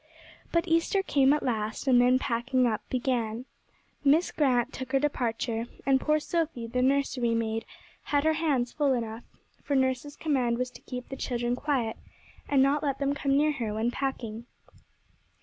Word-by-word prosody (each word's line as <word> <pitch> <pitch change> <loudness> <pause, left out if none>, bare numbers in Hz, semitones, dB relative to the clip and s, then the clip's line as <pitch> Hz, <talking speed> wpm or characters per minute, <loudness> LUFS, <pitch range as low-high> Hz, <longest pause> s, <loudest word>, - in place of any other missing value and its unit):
But 335 0 +1
Easter 335 +4 +2
came 275 -6 +3
at 300 - +1
last, 220 -3 -2
and 245 -2 +6
then 250 +1 +5
packing 255 0 0
up 225 -2 0
began. 245 -2 -1 0.6
Miss 300 +5 +4
Grant 260 -3 +1
took 260 0 -7
her 270 - +4
departure, 235 -4 -1 0.2
and 265 0 +3
poor 305 0 +2
Sophy, 315 -6 -2
the 250 +2 -1
nursery 260 -3 +1
maid, 225 0 -1 0.4
had 285 -1 +1
her 315 0 +3
hands 285 -7 0
full 285 -3 +1
enough, 230 -1 -4 0.4
for 285 - -1
nurse's 260 +2 0
command 255 -7 0
was 250 0 -2
to - - -14
keep 250 -1 -7
the 270 - -5
children 240 -2 -1
quiet, 255 -5 -1 0.5
and 275 -2 +4
not 280 +2 +2
let 275 -3 -1
them 280 0 0
come 275 -1 +1
near 300 +1 +3
her 230 -7 -3
when 225 +2 0
packing. 240 -4 -4
260 Hz, 170 wpm, -28 LUFS, 235-285 Hz, 0.6 s, and